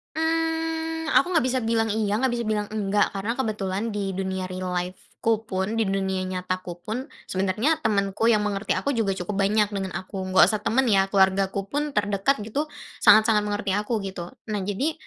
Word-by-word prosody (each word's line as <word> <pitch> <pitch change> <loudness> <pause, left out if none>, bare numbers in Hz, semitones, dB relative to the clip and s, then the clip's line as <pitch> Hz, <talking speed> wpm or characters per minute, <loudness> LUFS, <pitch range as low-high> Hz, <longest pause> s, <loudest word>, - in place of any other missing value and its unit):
Mmm, 325 0 -1
aku 360 0 +3
enggak 315 -6 +3
bisa 260 0 +1
bilang 225 -1 +1
"iya," 210 -1 0
enggak 260 - +3
bisa 235 - -2
bilang 210 -1 -1
"enggak." 205 -1 +1
Karena 215 +4 -1
kebetulan 215 -3 -2
di 200 -2 -3
dunia 190 0 -2
real 185 0 -4
life-ku 185 +5 -2
pun, 190 +3 -1
di 225 -3 +1
dunia 190 -1 -1
nyataku 185 -1 -4
pun, 250 +7 -4 0.2
sebenarnya 210 +12 0
temenku 200 0 +1
yang 210 -2 +3
mengerti 205 +1 -1
aku 280 - 0
juga 200 -5 0
cukup 195 +3 -2
banyak 210 +1 +2
dengan 195 -1 -2
aku, 190 +1 -6
enggak 185 - +7
usah 210 - -1
temen 260 +5 +2
ya, 195 -3 +3
keluargaku 195 0 +2
pun 290 +3 -3
terdekat 205 +3 +1
gitu, 290 +8 -2 0.3
sangat-sangat 215 -1 +6
mengerti 205 -2 -2
aku, 210 +3 0
gitu. 175 -3 -6 0.2
Nah 205 - -1
jadi, 205 +11 -1
210 Hz, 180 wpm, -25 LUFS, 195-230 Hz, 0.3 s, enggak